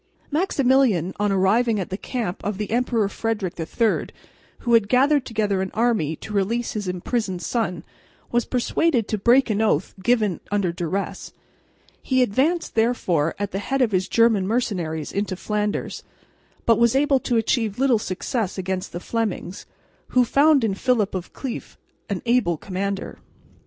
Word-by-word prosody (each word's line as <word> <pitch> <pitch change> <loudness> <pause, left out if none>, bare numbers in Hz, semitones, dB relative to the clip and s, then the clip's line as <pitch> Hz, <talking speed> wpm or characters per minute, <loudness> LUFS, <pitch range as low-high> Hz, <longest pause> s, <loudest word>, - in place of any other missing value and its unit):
Maximilian, 265 - +2
on 205 -1 +1
arriving 210 +4 +2
at 185 - -4
the - - -1
camp 215 -3 -4
of 205 -1 -2
the 210 0 -4
Emperor 235 -3 +1
Frederick 210 -3 -2
III, 215 +7 0 0.5
who 235 - 0
had 225 -3 +4
gathered 275 +2 +3
together 210 -4 0
an 190 - -2
army 215 -10 +1
to 210 - -9
release 225 +4 0
his 205 -3 -4
imprisoned 185 +1 -2
son, 180 -9 -2 0.5
was 240 0 +2
persuaded 250 -1 +1
to 215 - -2
break 240 +3 +4
an 210 +1 0
oath 220 - +1
given 210 -4 +1
under 200 -4 +1
duress. 175 +3 -4 0.7
He 260 -1 +2
advanced 285 - 0
therefore 190 -9 +1
at 205 -1 -3
the 195 - -2
head 270 +6 0
of 230 - +1
his 185 -1 +1
German 225 -5 +3
mercenaries 180 -9 -2
into 200 -2 -2
Flanders, 210 +2 -2 0.6
but 230 -1 +4
was 235 +1 +4
able 275 -1 +3
to 245 -2 0
achieve 225 -2 0
little 260 -3 +3
success 200 +1 -3
against 190 0 -3
the 175 - -4
Flemings, 205 -3 -3 0.4
who 250 -1 +3
found 280 +1 +4
in 215 -3 +1
Philip 220 -1 +1
of 185 -2 -5
Cleef 265 -4 -6 0.3
an 200 -3 -3
able 235 -9 +2
commander. 195 +3 -4
215 Hz, 155 wpm, -23 LUFS, 190-245 Hz, 0.7 s, had